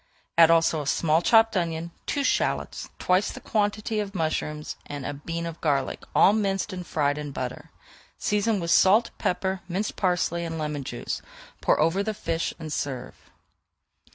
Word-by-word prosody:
Add 165 -1 +7
also 165 -1 +4
a 145 - -6
small 160 +2 +2
chopped 225 +3 +5
onion, 170 -2 -1 0.2
two 285 - 0
shallots, - - 0
twice 185 +3 +2
the - - -8
quantity 215 0 -1
of 200 -1 -4
mushrooms, 155 -2 -2
and 145 -2 -6
a 145 - -3
bean 165 +4 -5
of 170 -1 -7
garlic, 140 -4 0
all 200 - +7
minced 200 -1 0
and 180 -1 -6
fried 145 -1 0
in 150 -1 -5
butter. 130 -2 -5 0.5
Season 210 0 +1
with 170 -1 -2
salt, 210 +5 +5
pepper, 190 +1 -1
minced 190 +4 -2
parsley, 175 -2 +1
and 165 -1 -4
lemon 150 -2 -3
juice; 120 -2 -4 0.4
pour - - +3
over 165 +5 +2
the 215 +1 -2
fish 165 -4 -2
and 155 -2 -6
serve. 130 -3 -5
170 Hz, 165 wpm, -26 LUFS, 150-195 Hz, 0.5 s, Add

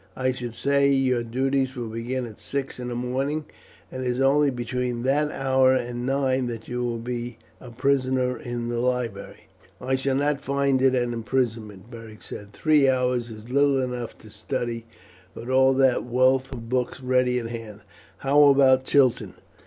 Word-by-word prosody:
I 130 0 0
should 120 -2 -6
say 140 +1 +2
your 130 -3 +2
duties 130 +3 -1
will 120 -3 -5
begin 120 +3 -3
at 110 -3 -11
six 140 -2 -4
in 125 - -5
the 120 - -4
morning, 135 +5 -2 0.5
and 130 0 -5
it - - -2
is 125 +1 -1
only 140 +2 +4
between 125 -1 -3
that 145 +3 +2
hour 130 -2 +3
and 120 0 -3
nine 135 -2 +1
that 115 -2 -6
you 125 0 -3
will 120 -1 -2
be 120 0 -5 0.2
a 125 - -11
prisoner 130 0 0
in 120 -1 -5
the 120 0 -2
library." 120 -5 -3 0.3
"I 130 +1 -2
shall 135 0 -1
not 145 +1 +1
find 140 -1 0
it 130 -1 +4
an 120 -1 0
imprisonment," 115 -3 -3
Beric 115 -2 -11
said. 105 0 -8
"Three 150 +3 +3
hours 125 -2 0
is 110 +2 -10
little 140 0 +3
enough 125 -2 -4
to 110 - -15
study, 115 +1 -4 0.5
with 120 +3 -6
all 130 0 +5
that 130 -2 +3
wealth 130 +2 +2
of 115 -3 -7
books 125 +1 -1
ready 125 -1 +2
at 115 -2 -3
hand. 110 -3 -8 0.4
How 145 +2 +6
about 135 -2 +5
Chiton?" 125 -9 +2
125 Hz, 175 wpm, -24 LUFS, 120-135 Hz, 0.5 s, How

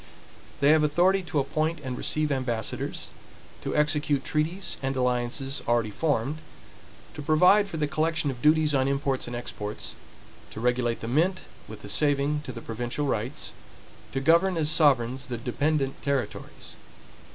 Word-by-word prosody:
They 140 +1 +6
have 155 0 +5
authority 175 +6 +3
to 160 -3 -4
appoint 155 +4 0
and 130 -1 -4
receive 155 +3 0
ambassadors; 120 -5 -3 0.5
to - - -3
execute 150 -2 +2
treaties 165 +6 -1
and 135 0 -1
alliances 125 +2 -1
already 115 -2 +2
formed; 145 +2 -1 0.7
to - - -7
provide 180 +8 +5
for 170 - -5
the 150 - +1
collection 155 0 0
of 125 -2 -9
duties 155 +1 +4
on 135 -1 +2
imports 140 -2 -1
and 120 - -5
exports; 105 -3 -6 0.6
to - - -8
regulate 120 0 0
the 115 - -4
mint, 170 +9 +1 0.2
with 110 - -10
a - - -7
saving 145 +6 +2
to - - -5
the 115 -2 -8
provincial 120 +6 -3
rights; 130 +3 -2 0.6
to 135 - -1
govern 170 +5 +3
as 155 -1 +1
sovereigns 130 -4 +2
the 120 - -3
dependent 135 +3 -1
territories. 140 -6 -3
140 Hz, 150 wpm, -27 LUFS, 125-155 Hz, 0.7 s, They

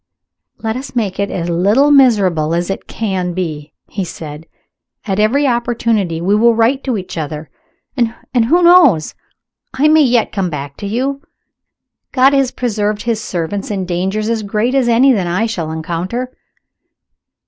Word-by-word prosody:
"Let 220 -1 -3
us 265 +1 -7
make 205 -5 -2
it 200 - 0
as 170 -2 -3
little 205 +12 +3
miserable 195 - +3
as 175 +2 -1
it - - -6
can 190 -5 -3
be," 155 -5 -4 0.2
he 200 - -4
said. 160 -2 -8 0.6
"At 195 -2 -1
every 250 +8 +2
opportunity 230 -8 0
we 185 +4 0
will 230 +2 +4
write 235 +5 +2
to 255 -5 -1
each 180 -3 -6
other. 150 0 -6 0.4
And, 235 -3 0 0.3
who 345 +8 +3
knows 335 - +5 0.6
I 280 +3 +3
may 310 0 +5
yet 245 -5 +2
come 195 -3 -1
back 140 -3 -6
to 200 - -5
you? 265 +6 -2 0.9
God 265 +1 +4
has 275 -2 +2
preserved 210 -4 -2
his 225 -2 -2
servants 180 +3 -4
in 195 -3 -2
dangers 190 +4 -2
as 230 -1 -1
great 215 +4 -1
as 265 -3 +2
any 250 +4 +5
that 190 -6 -1
I 185 +6 0
shall 175 -9 -3
encounter. 175 +11 -4
210 Hz, 160 wpm, -16 LUFS, 180-245 Hz, 0.9 s, knows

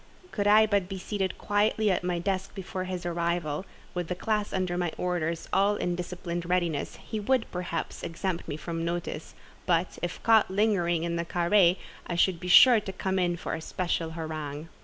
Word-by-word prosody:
Could 205 -1 -1
I 215 +1 +7
but 200 -4 0
be 195 - -4
seated 190 0 -2
quietly 210 0 +2
at 185 - 0
my 180 -1 0
desk 190 +2 -2
before 185 -1 -4
his 180 -1 -5
arrival, 170 -1 -1 0.3
with 175 -2 -3
the 180 - -2
class 210 +2 -1
under 185 -2 -1
my 175 -2 -1
orders 170 -2 -2
all 200 +2 +3
in 175 -3 -1
disciplined 175 -1 -5
readiness, 170 -5 0
he 220 - -6
would, 245 +3 +1
perhaps, 180 -1 -4
exempt 170 +1 -3
me 145 - -4
from 165 +1 -4
notice; 170 -2 -4 0.3
but, 175 0 +1
if 175 0 -3
caught 225 -2 +5
lingering 190 -5 +1
in 170 0 -1
the 170 - -2
carré, 175 +1 +3 0.3
I 175 - -2
should 175 0 +2
be 180 - -6
sure 235 +6 +8
to 200 -2 -6
come 190 0 -1
in 175 -1 +1
for - - -4
a 160 - -3
special 165 -1 -2
harangue. 155 -1 -5
180 Hz, 190 wpm, -28 LUFS, 170-195 Hz, 0.3 s, sure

